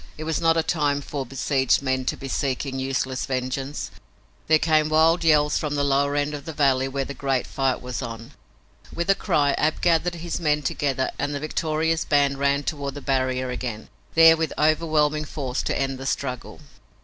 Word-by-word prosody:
It 155 - -6
was 160 0 -2
not 165 0 +3
a 165 - +2
time 145 -4 0
for 140 -2 -5
besieged 135 0 +1
men 130 -1 -1
to - - -1
be 135 - -7
seeking 135 0 -2
useless 130 0 -2
vengeance. 130 +2 -3 0.6
There 155 - +6
came 155 -1 +2
wild 165 +2 +4
yells 150 -2 +3
from 150 -1 -2
the 145 - +1
lower 140 +1 +1
end 145 +1 0
of 145 -2 -7
the 160 - -6
valley 135 -3 +2
where 135 0 -2
the 140 - -6
greater 135 -2 -1
fight 135 -2 -1
was 125 +1 -4
on. 115 -2 -7 0.6
With 170 +3 0
a - - +6
cry 150 -8 +1
Ab 155 +1 +1
gathered 175 0 +2
his 170 +1 -4
men 150 -3 +1
together 135 -1 -1
and 145 0 -1
the - - -2
victorious 160 +1 -1
band 140 -2 +2
ran 140 +1 +1
toward 140 -2 -4
the 145 - -7
barrier 130 -2 -1
again, 120 -3 -5 0.3
there 165 0 +8
with 160 0 -2
overwhelming 155 -1 +2
force 135 -4 -3
to - - -2
end 135 -1 -2
the 135 - -5
struggle. 130 +1 -4
145 Hz, 195 wpm, -24 LUFS, 135-155 Hz, 0.6 s, there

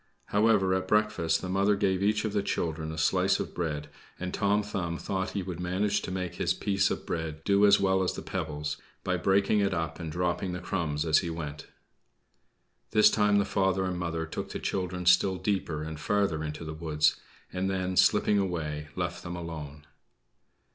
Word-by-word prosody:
However, 105 -3 +3
at 95 0 -1
breakfast 105 -6 +1
the - - -3
mother 100 +2 +2
gave 95 -2 +1
each 105 +2 +2
of 105 - -2
the 100 - +2
children 80 -4 -2
a 80 - -7
slice 75 - +2
of - - -4
bread, 75 -4 -3 0.3
and 90 0 -4
Tom 100 +1 +2
Thumb 90 -5 -3
thought 95 +1 -3
he 95 - -1
would 90 -2 -6
manage 95 +3 0
to - - -5
make 90 -2 -4
his - - +1
piece 100 -1 +1
of - - -4
bread 80 -1 -4
do 100 +2 +4
as 100 0 +6
well 95 -1 +2
as 90 - 0
the - - -7
pebbles, 75 0 -3 0.3
by - - 0
breaking 100 +2 +2
it 100 -2 +1
up 80 +1 -3
and 80 -2 -5
dropping 90 +2 -1
the 90 - -4
crumbs 80 -4 -2
as 80 -1 +5
he 85 - -3
went. 75 -3 -6 1.2
This 105 0 +6
time 105 -1 +3
the 100 - +3
father 95 -1 +1
and 90 -1 -2
mother 85 -2 -2
took - - -5
the - - -5
children 90 -1 -3
still 90 +2 +5
deeper 90 -5 -2
and 80 -1 -6
farther 100 -6 0
into 75 +1 -5
the 80 - -5
wood, 80 -1 -1 0.5
and 95 +1 -1
then, 95 -1 -1
slipping 105 +2 +4
away, 75 -6 -2
left - - -3
them 85 - -6
alone. 75 -3 -7
90 Hz, 195 wpm, -29 LUFS, 80-100 Hz, 1.2 s, as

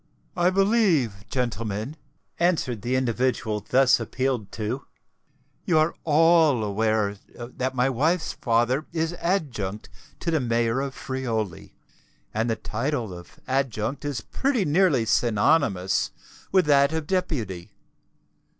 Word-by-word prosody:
"I 175 0 +3
believe, 185 - +2
gentlemen," 115 0 -3 0.4
answered 160 - +1
the 125 +4 -1
individual 125 -3 0
thus 130 0 +5
appealed 130 -6 -2
to, 115 +5 -4 0.8
"you 175 - +2
are 155 +2 +3
all 160 -5 +4
aware 105 0 0 0.2
that 130 +2 -4
my 125 +1 +2
wife's 160 +7 0
father 120 +5 +1
is 165 0 -1
Adjunct 120 - -2 0.3
to 170 - -1
the 160 - +2
Mayor 115 0 +1
of 140 -1 -4
Friuli; 115 -9 -4 0.6
and 110 +2 0
the 115 - +1
title 115 -2 -3
of 85 -1 -12
Adjunct 130 -1 -1
is 145 -6 -3
pretty 260 - -1
nearly 150 -6 +3
synonymous 110 - +2 0.4
with 190 -3 +4
that 140 -1 +4
of 160 -1 -2
Deputy. 135 - -2
130 Hz, 120 wpm, -25 LUFS, 110-155 Hz, 0.8 s, thus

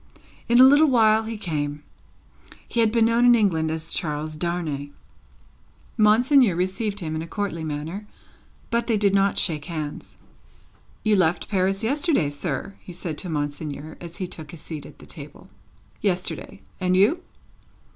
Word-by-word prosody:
In 240 +1 +5
a - - +10
little 285 +4 +7
while 220 -4 +4
he 225 0 -5
came. 150 -6 -3 0.8
He 235 - -2
had 225 -2 +4
been 230 -1 +3
known 230 +1 +3
in 245 0 +7
England 170 -8 +2
as 160 +1 -3
Charles 155 -1 -3
Darnay. 155 -4 -2 1.1
Monseigneur 230 - +5
received 190 +3 -1
him 160 -2 -3
in 155 - -2
a 165 - -6
courtly 170 -2 -3
manner, 160 +7 -5 0.6
but 235 0 0
they 225 -3 +2
did 200 -1 +2
not 195 0 +2
shake 150 -4 -1
hands. 155 -4 -6 0.9
"You 215 -1 +3
left 180 -2 +1
Paris 195 +1 +1
yesterday, 280 - +1
sir?" 145 +6 -4
he 180 - -11
said 170 -2 -5
to 180 - -5
Monseigneur, 145 0 -4
as 170 -1 -8
he 185 - -3
took 160 -4 -9
his 165 -1 -10
seat 155 -3 -7
at - - -15
table. 150 -3 -10 0.5
"Yesterday. 175 - -2 0.2
And 185 0 +2
you?" 215 - +4
180 Hz, 155 wpm, -24 LUFS, 155-215 Hz, 1.1 s, a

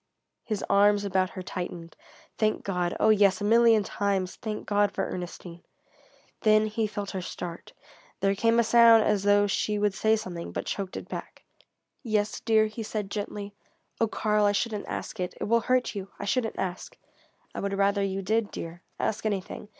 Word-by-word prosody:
His 215 -3 -3
arms 205 0 +4
about 190 -1 +1
her 185 - -7
tightened. 175 -2 -6 0.4
Thank 215 -1 +1
God 180 -3 -1
oh 220 - +4
yes, 200 -3 +4
a - - -5
million 225 0 +5
times 195 -2 -1
thank 215 -1 -5
God 205 -1 +2
for - - -2
Ernestine! 175 -1 -7 0.8
Then 215 -1 +4
he 215 0 -1
felt 205 -1 -5
her 190 - -4
start; 175 -1 -7 0.5
there 195 0 +2
came 230 +3 +2
a - - +5
sound 230 -1 +7
as 210 -2 +1
though 205 0 +4
she 210 +1 0
would 205 -1 +1
say 220 +2 +2
something, 180 -6 -6
but - - -3
choked 195 -2 -4
it - - -7
back. - - -8 0.6
"Yes, 215 -4 -1
dear?" 220 -1 +3
he 215 +1 -6
said 210 -2 -4
gently. 205 -1 -5 0.5
"Oh, 225 - +3
Karl, 210 -1 +1
I 205 - +3
shouldn't 210 0 -2
ask 220 - -5
it. 180 0 -3
It - - -3
will 230 +2 +2
hurt 255 0 +1
you. 195 -2 -6
I - - -5
shouldn't 225 +2 -1
ask." 185 -1 -4 0.6
"I - - -5
would 200 0 -2
rather 200 0 +2
you 195 0 -2
did, 220 +2 +1
dear. 170 +1 -7 0.2
Ask 210 - -1
anything. 205 0 -4
205 Hz, 185 wpm, -27 LUFS, 195-215 Hz, 0.8 s, sound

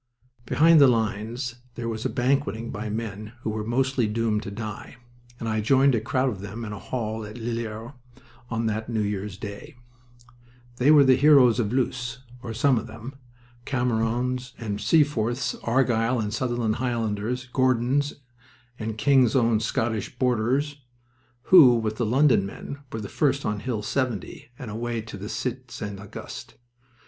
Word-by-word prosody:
Behind 160 0 +6
the 140 - +9
lines 115 +2 -1 0.2
there 120 -1 -4
was 110 -1 -3
banqueting 125 -3 0
by 110 +2 -5
men 110 0 -5
who 110 - -2
were 105 0 -3
mostly 125 +1 +1
doomed 110 0 0
to 100 - -6
die, 110 +2 -7 0.4
and 115 - -4
I 110 -1 0
joined 135 +5 +4
a 115 - +1
crowd 130 +4 +1
of 100 -6 -6
them 105 +4 -6
in 105 - -5
a 100 - -7
hall 110 -2 -4
at 105 +1 -9
Lillers 115 0 -4 0.6
on 115 0 -1
that 110 +1 -2
New 110 -2 0
Year's 100 -1 -3
day. 100 +2 -8 1.0
They 125 +4 +3
were 150 -2 +8
the 130 -1 +6
heroes 135 -5 +6
of 110 -3 0
Loos 125 -1 -2 0.2
or 115 - -6
some 125 +2 +2
of - - -8
them 115 +4 -9 0.5
Camerons 125 +1 -1
and 105 -3 -4
Seaforths, 125 -2 +2
Argyll 120 -1 +1
and 105 -1 -2
Sutherland 120 -2 -1
Highlanders, 120 0 -2
Gordons 130 +2 +2 0.6
and 110 -1 -4
King's 130 0 +4
Own 115 -4 +3
Scottish 110 +1 -2
Borderers, 130 +4 0 0.6
who, 145 -10 +8
with 110 -2 -2
the 120 - 0
London 130 -2 +4
men, 120 +8 -7
were 110 -1 -5
first 140 +6 0
on 105 0 -1
Hill 110 -2 -3
70 120 -3 -3
and 120 -4 -7
away 115 +1 -3
to 110 -1 -9
the 100 +1 -7
Cite 125 0 -4
St. 105 -4 -6
Auguste. 100 0 -9
115 Hz, 155 wpm, -25 LUFS, 110-130 Hz, 1.0 s, the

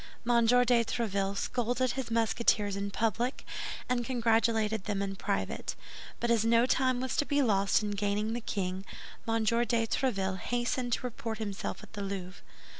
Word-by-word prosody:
M. 235 -1 +4
de 245 - +5 0.3
Tréville 200 -4 -1
scolded 245 +2 0
his 265 -2 -4
Musketeers 225 -2 +2
in 200 0 -2
public, 230 +5 -1 0.4
and 245 -1 +1
congratulated 225 -3 +1
them 205 -2 -1
in 195 -1 -2
private; - - -2 0.4
but 235 - +1
as 225 -2 +3
no 230 +1 +4
time 255 -1 +2
was 260 0 -2
to - - +3
be 285 -1 +2
lost 200 -3 +3
in 205 - -1
gaining 205 +2 0
the 240 - -3
king, 190 -3 -3 0.4
M. 225 0 +1
de 220 - +2
Tréville 230 -4 +1
hastened 245 0 -1
to - - -1
report 230 -2 -4
himself 205 -3 -4
at - - -14
the 205 - -5
Louvre. 195 -1 -5
225 Hz, 165 wpm, -31 LUFS, 200-240 Hz, 0.4 s, de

